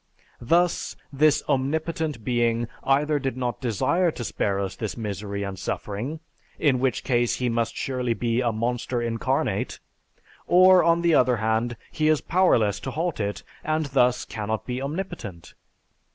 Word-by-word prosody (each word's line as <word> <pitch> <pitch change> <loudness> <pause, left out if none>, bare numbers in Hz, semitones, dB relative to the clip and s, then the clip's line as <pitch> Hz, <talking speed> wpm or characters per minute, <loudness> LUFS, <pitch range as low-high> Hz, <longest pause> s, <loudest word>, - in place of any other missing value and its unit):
Thus, 170 +8 +1 0.2
this 150 +1 +3
omnipotent 150 -1 -1
being 120 0 +1 0.2
either 145 +2 +2
did 135 -2 -3
not 125 0 -3
desire 155 - +1
to 130 - -5
spare 100 -3 -1
us 95 -1 -3
this 110 -1 -4
misery 100 -2 -4
and 95 -1 -5
suffering, 125 +10 -4 0.4
in 135 -5 +2
which 130 -1 0
case 120 -2 +1
he 125 -1 -1
must 115 -1 -1
surely 125 -3 -1
be 115 +3 0
a 120 -2 +1
monster 120 +2 -2
incarnate; 115 -2 -1 0.7
or, 185 +1 +7
on 170 +1 +3
the 170 -1 +4
other 125 -4 +4
hand, 110 +2 0
he 155 - 0
is 155 -1 +4
powerless 120 - +2
to - - -5
halt 160 +3 -2
it, 100 -1 -3 0.2
and 155 0 0
thus 125 -2 +3
cannot 110 -1 -4
be 125 +1 -3
omnipotent. 140 - -6
125 Hz, 150 wpm, -25 LUFS, 115-155 Hz, 0.7 s, or